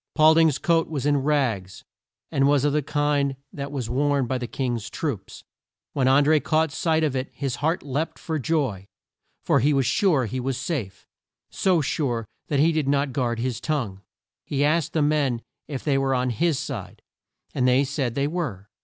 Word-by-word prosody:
Paul 155 0 +7
ding's 160 -3 +4
coat 165 -1 +2
was 145 -4 -3
in 145 -1 +3
rags, 130 -10 -1 0.5
and 135 0 +3
was 145 -1 +3
of 145 - +2
the 150 - +2
kind 145 -1 0 0.2
that 140 0 -5
was 130 -5 -3
worn 140 +2 +1
by 130 +1 -2
the 120 - -4
King's 120 -5 -3
troops. - - -5 0.5
When 135 -3 +1
An 135 +2 +5
dré 155 0 +3
caught 160 0 +1
sight 160 +1 +1
of 145 -4 0
it 130 0 -2
his 135 -3 -3
heart 160 +5 0
leapt 145 +3 -3
for 160 -2 -3
joy, 130 - -1 0.6
for 140 - +3
he 145 +4 +3
was 135 -2 +2
sure 160 - +2
he 125 +4 -4
was 130 0 -2
safe. 110 - -4 0.4
So 180 -4 +2
sure 125 -6 -1 0.2
that 145 - 0
he 160 +3 +5
did 155 -3 0
not 140 -1 +1
guard 120 -3 0
his 120 0 -2
tongue. 120 -11 -2 0.4
He 145 0 0
asked 155 0 +1
the 155 - +2
men 145 -5 +1 0.2
if 140 -4 -5
they 140 -3 +2
were 135 -1 +1
on 125 0 0
his 160 +4 +1
side, - - -6 0.5
and 125 -1 +1
they 130 +2 +4
said 135 -4 -2
they 140 - +1
were. 145 - -4
140 Hz, 195 wpm, -24 LUFS, 125-150 Hz, 0.6 s, Paul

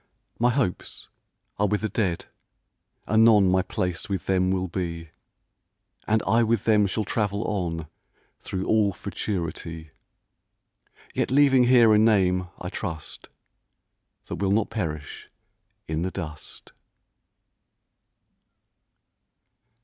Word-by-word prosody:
My 120 +1 +4
hopes 125 -7 -3 0.5
are 105 - +3
with 105 +1 0
the 110 - 0
Dead, 95 -6 -2 0.8
anon 110 -2 +5
My 95 0 +3
place 90 +2 -3
with 95 -1 -3
them 95 -1 +1
will 95 0 0
be, 85 -2 -5 1.0
And 110 0 +2
I 115 - +3
with 115 -2 +1
them 105 -2 +3
shall 105 +2 -2
travel 105 0 -1
on 85 -6 -3 0.5
Through 95 0 -4
all 105 -3 +2
Futurity; 85 -5 -5 1.2
Yet - - -1
leaving 135 -2 +5
here 120 -3 +6
a 105 - +5
name, 95 -5 +3
I 90 - -5
trust, 80 -6 -6 1.0
That - - -6
will 100 -1 0
not 105 +2 +1
perish 80 -9 -5 0.6
in 80 +1 -2
the 90 - -1
dust. 80 -4 -8
100 Hz, 110 wpm, -25 LUFS, 90-110 Hz, 1.2 s, here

